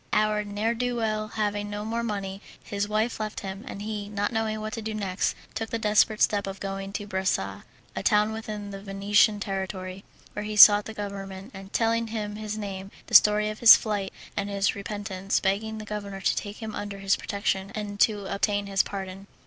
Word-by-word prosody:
Our 215 0 +2
ne'er 210 +3 -1
do 245 +1 -1
well 215 -2 -1
having 205 -1 -2
no 205 0 -4
more 230 +1 -1
money, 200 -3 -4 0.2
his 205 0 -2
wife 215 +2 0
left 215 -1 -4
him, 195 +1 -6
and 200 - -6
he, 210 -1 -4
not 205 0 -1
knowing 220 -1 -1
what 215 0 -5
to 225 - -4
do 220 0 -4
next, 195 -3 -1 0.2
took 225 -1 -3
the 230 - -1
desperate 215 0 +3
step 205 -1 +2
of 195 0 -6
going 195 0 -4
to 205 - -3
Bressa, 190 -2 -1 0.3
a - - -2
town 210 +1 +3
within 215 -2 -5
the 195 0 -7
Venetian 205 +2 +3
territory, 190 -1 -4 0.3
where 210 - -4
he 210 0 -4
sought 205 0 +9
the 220 - -7
governor, 195 -2 -6 0.3
telling 230 0 +1
him 210 -2 -4
his 215 0 -4
name, 195 -2 -5 0.2
the - - -13
story 210 0 +7
of 215 - -9
his 235 - +11
flight, 205 -3 -2 0.2
and 200 0 -2
his 200 0 +1
repentance, 200 -1 -2
begging 215 +3 -1
the 215 - -7
governor 200 -2 -5
to 190 - +1
take 205 +3 -5
him 215 -1 -5
under 205 -1 -5
his 195 0 +2
protection 195 -1 -2
and 205 -1 -5
to 205 -2 +3
obtain 200 +1 0
his 195 -1 +2
pardon. 195 0 -6
205 Hz, 200 wpm, -27 LUFS, 195-215 Hz, 0.3 s, his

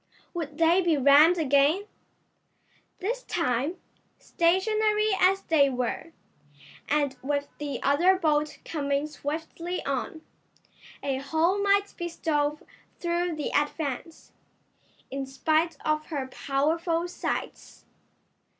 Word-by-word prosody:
Would 310 -4 -5
they 335 +3 +4
be 335 -4 +2
rammed 285 +6 +6
again? 295 +5 +3 1.1
This 470 +6 -3
time, 295 - -1 0.4
stationary 425 +5 +1
as 385 +1 +3
they 285 -4 +4
were, 255 +5 -3 0.8
and 285 -2 +1
with 285 +1 -2
the 290 -1 -4
other 345 +7 +4
boat 305 -4 0
coming 280 -2 -1
swiftly 320 +4 -5
on, 280 +4 -3 0.8
a 270 -2 -1
hole 320 +8 +1
might 400 0 +2
be 345 0 -3
stove 300 -3 -1 0.3
through 345 -1 -1
the 300 - -3
Advance, 295 +1 -2 0.8
in 270 0 -4
spite 315 +4 0
of 305 0 0
her 285 -5 -3
powerful 330 +6 0
sides. 350 - -5
315 Hz, 105 wpm, -27 LUFS, 285-345 Hz, 1.1 s, rammed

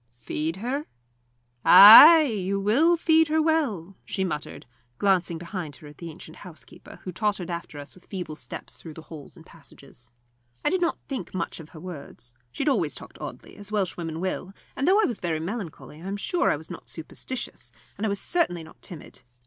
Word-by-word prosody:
"Feed 155 +7 -3
her? 255 +9 -4 0.8
Ay 300 +11 +11
you 200 -7 -2
will 280 - +3
feed 320 -1 +3
her 315 +1 +1
well," 270 - 0
she 190 - -3
muttered, 150 -5 -5 0.3
glancing 185 -4 +1
behind 170 -3 -6
her 130 - -15
at 145 -1 -15
the 170 - -7
ancient 160 0 -12
housekeeper, 180 -5 -13
who 185 - -5
tottered 195 -2 -2
after 170 -3 -6
us 145 0 -9
with 185 - -20
feeble 180 -6 -6
steps - - -9
through 160 -3 -11
the 160 - -10
halls 155 +2 -12
and 165 - -15
passages. 140 -7 -13 0.5
I - - +3
did 370 0 0
not 340 - 0
think 255 - -6
much 170 -1 -4
of 160 -1 -11
her 160 - -12
words. 150 -8 -10 0.2
She 115 - -3
had - - +2
always - - 0
talked - - -11
oddly, - - -9
as 205 0 -9
Welshwomen 175 -5 -2
will, 185 +1 -4 0.2
and 275 - -1
though 390 +3 +5
I 435 - +4
was 235 - -3
very 165 -3 -2
melancholy 170 -4 -7
I 185 - -8
am 200 +1 -3
sure 350 - 0
I - - +2
was 155 - -10
not - - -10
superstitious, 205 +10 -7 0.2
and 205 - -7
I 220 - +1
was 200 0 -1
certainly 185 - 0
not 160 - -16
timid. 165 -7 -11
185 Hz, 195 wpm, -25 LUFS, 160-225 Hz, 0.8 s, Ay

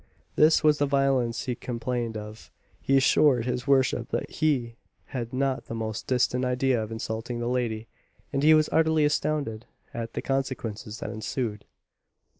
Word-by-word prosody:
This 155 +1 +5
was 150 -1 +4
the 145 - +2
violence 135 -4 +1
he 125 - -1
complained 120 -1 -3
of. 105 +1 -9 0.3
He 135 - +3
assured 135 -2 +4
his 125 +1 -2
worship 135 -2 +2
that - - -3
he 130 -7 0 0.4
had 120 -3 -3
not 130 0 -1
the 115 - -6
most 110 -1 -4
distant 125 0 +1
idea 125 -1 +1
of 110 0 -5
insulting 115 +2 -4
the 120 - -2
lady, 120 -3 -1 0.5
and 140 - +1
he 155 +2 +7
was 155 0 +3
utterly 160 -1 +3
astonished 145 -6 -1 0.3
at 115 -1 -5
the - - -4
consequences 120 -5 -3
that 110 - -4
ensued. 110 -1 -4
125 Hz, 160 wpm, -27 LUFS, 115-135 Hz, 0.5 s, he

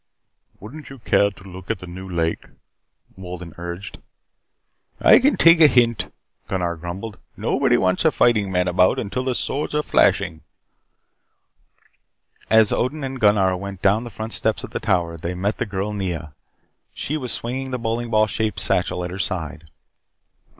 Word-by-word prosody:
"Wouldn't 140 +10 -10
you 135 - -10
care 100 -3 +2
to 95 -1 -16
look 95 -1 -11
at - - 0
the 90 - -10
new 95 +2 -9
lake?" 85 -2 -1 0.7
Wolden 90 -3 -8
urged. 85 +2 -7 1.0
"I - - +7
can 285 +3 +2
take 165 0 +6
a 155 - +10
hint," 120 -5 +2 0.4
Gunnar 90 -3 -1
grumbled. 95 +6 -7 0.2
"Nobody - - +2
wants 95 0 +1
a 160 - +4
fighting 105 -8 +2
man 90 -1 +1
about 90 +1 +3
until 115 +4 -3
the 130 -1 -1
swords 150 +4 -2
are 150 - +1
flashing 80 - +2 1.1
" - - -34
As 110 -1 +5
Odin 140 +4 -1
and 135 -1 -5
Gunnar 100 -3 +3
went 100 0 -7
down 105 +3 +3
the 120 - -7
front 110 +1 -6
steps 110 - 0
of - - -8
the - - -3
tower, 90 -6 0
they 85 +3 -4
met 100 +4 -2
the - - -1
girl 100 +1 -3
Nea. 85 -7 -4 0.6
She 150 - -3
was 130 -5 -3
swinging 130 +3 -3
the 125 - -2
bowling 115 0 -2
ball 110 -1 +4
shaped 110 0 -2
satchel 90 - 0
at 90 - -6
her 95 - -6
side. 80 -5 -4
100 Hz, 170 wpm, -22 LUFS, 90-120 Hz, 1.1 s, a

